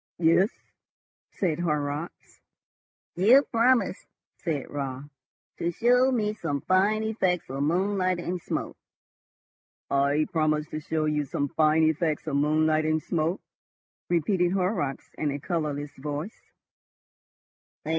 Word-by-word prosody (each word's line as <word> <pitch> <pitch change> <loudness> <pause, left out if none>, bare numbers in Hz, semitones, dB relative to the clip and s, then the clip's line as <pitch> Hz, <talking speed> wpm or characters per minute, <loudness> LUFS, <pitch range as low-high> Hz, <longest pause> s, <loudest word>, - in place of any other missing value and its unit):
"Yes," 170 +4 +4 0.8
said 170 -5 -1
Horrocks. 150 -1 -3 0.7
"You 235 +10 +6
promised," 235 -4 +2 0.3
said 155 -5 -2
Raut, 135 -2 -4 0.6
"to 170 - 0
show 250 +7 +3
me 215 -4 0
some 145 -9 -3
fine 205 +4 +2
effects 190 -6 0
of 135 +1 -3
moonlight 185 +4 +1
and 175 +1 -4
smoke." - - -4 1.1
"I 140 +2 +2
promised 155 -1 0
to 155 - -3
show 155 0 -2
you 150 -1 0
some 140 +1 -2
fine 155 +1 +3
effects 155 0 +1
of 155 -3 -2
moonlight 155 +1 +2
and 155 0 0
smoke," 170 +2 -1 0.7
repeated 175 +1 +1
Horrocks 180 -8 -1
in 150 - 0
a 140 - -2
colourless 150 -3 -3
voice. 150 +8 -5
160 Hz, 115 wpm, -26 LUFS, 150-185 Hz, 1.1 s, You